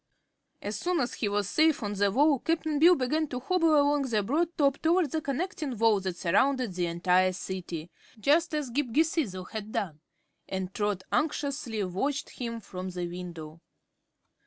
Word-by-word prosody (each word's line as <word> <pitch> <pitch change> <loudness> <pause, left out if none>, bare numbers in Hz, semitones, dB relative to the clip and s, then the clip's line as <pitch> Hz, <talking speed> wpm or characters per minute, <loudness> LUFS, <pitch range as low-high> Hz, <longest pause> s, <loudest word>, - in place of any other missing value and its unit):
As 205 0 -3
soon 355 +6 0
as 245 -3 -1
he 210 - -1
was 205 -1 0
safe 310 +1 +3
on 205 0 -2
the 200 0 +2
wall 285 +4 +4
Cap'n 315 -1 0
Bill 345 +3 +7
began 305 +3 0
to 250 -3 -4
hobble 325 +2 +3
along 285 0 +3
the 215 -3 +1
broad 325 - 0
top 280 -2 +2
toward 330 -3 +2
the 315 - -1
connecting 285 - -3
wall 220 -2 +4
that 185 -2 -4
surrounded 245 +6 +2
the 175 -1 -1
entire 180 +2 +2
City 175 -3 -5 0.3
just 320 +7 +2
as 290 -5 -2
Ghip 280 +2 0
Ghisizzle 270 - 0
had 215 -1 -5
done 160 -9 -3 0.5
and 190 -1 -3
Trot 205 -3 -1
anxiously 280 -7 -1
watched 265 +11 -2
him 230 -2 -5
from 185 -3 -7
the 180 -1 -4
window. 170 -3 -8
235 Hz, 170 wpm, -28 LUFS, 190-300 Hz, 0.5 s, Bill